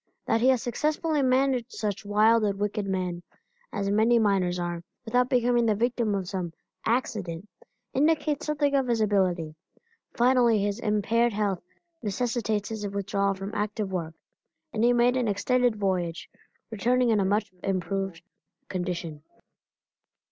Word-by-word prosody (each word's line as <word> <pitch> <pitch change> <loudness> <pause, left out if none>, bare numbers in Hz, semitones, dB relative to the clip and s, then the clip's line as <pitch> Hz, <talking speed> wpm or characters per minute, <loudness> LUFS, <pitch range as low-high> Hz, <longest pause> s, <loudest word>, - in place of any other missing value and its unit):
That 225 - +1
he 250 - +4
has 255 -3 +2
successfully 305 +4 0
managed 255 -2 +1
such 210 0 -3
wild 215 +2 +4
and 200 -2 0
wicked 205 0 -1
men, 180 -2 -2 0.5
as 200 - -2
many 220 +3 +4
miners 195 -5 +2
are, 175 -1 -3 0.2
without 245 +2 +2
becoming 240 -1 +2
the 215 - +3
victim 235 -1 0
of 190 -2 -3
some 180 -3 -4 0.3
"accident," 210 -7 -1 0.5
indicates 300 +1 +1
something 290 -1 +1
of 270 -2 +2
his 235 -2 +1
ability. 185 -7 +1 0.6
Finally 240 -2 +4
his 205 +2 -1
impaired 225 +2 +1
health 200 -3 -1 0.4
necessitated 220 -1 -1
his 215 -2 -4
withdrawal 200 0 -1
from 195 +2 -6
active 210 -1 -2
work, 165 -3 -3 0.6
and 220 - 0
he 240 - +5
made 245 +1 +3
an 250 -2 +1
extended 245 +3 +2
voyage, 185 -4 -2 0.4
returning 240 +3 +2
in 215 - +3
a - - +2
much 205 +1 0
improved 195 -2 -2 0.5
condition. 175 -4 -4
215 Hz, 140 wpm, -27 LUFS, 195-240 Hz, 0.6 s, he